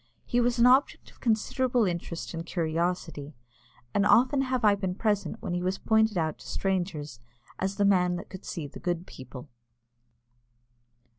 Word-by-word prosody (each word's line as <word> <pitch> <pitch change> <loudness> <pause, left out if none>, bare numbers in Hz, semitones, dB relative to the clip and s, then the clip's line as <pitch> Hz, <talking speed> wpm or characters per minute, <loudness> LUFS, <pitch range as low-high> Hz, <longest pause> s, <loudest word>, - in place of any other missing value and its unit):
He 245 -1 +1
was 240 0 +1
an 235 - +5
object 260 +3 +3
of - - -24
considerable 245 +1 +1
interest 170 -2 -4
and 165 0 -4
curiosity, 165 -3 -2 0.6
and 200 - +3
often 255 +6 +4
have 255 -3 0
I 205 - +6
been 190 -2 -2
present 215 +1 -1
when - - -3
he 175 - -1
was 185 +2 -1
pointed 220 -2 +2
out 160 -2 -1
to - - -12
strangers 175 -9 -2 0.4
as 190 +1 -1
"the 205 - +2
man 180 -3 +3
that 180 +4 -6
could 190 - -10
see 160 - -5
the 140 - -9
good 175 0 -2
people." 130 0 -10
190 Hz, 165 wpm, -28 LUFS, 170-220 Hz, 0.6 s, I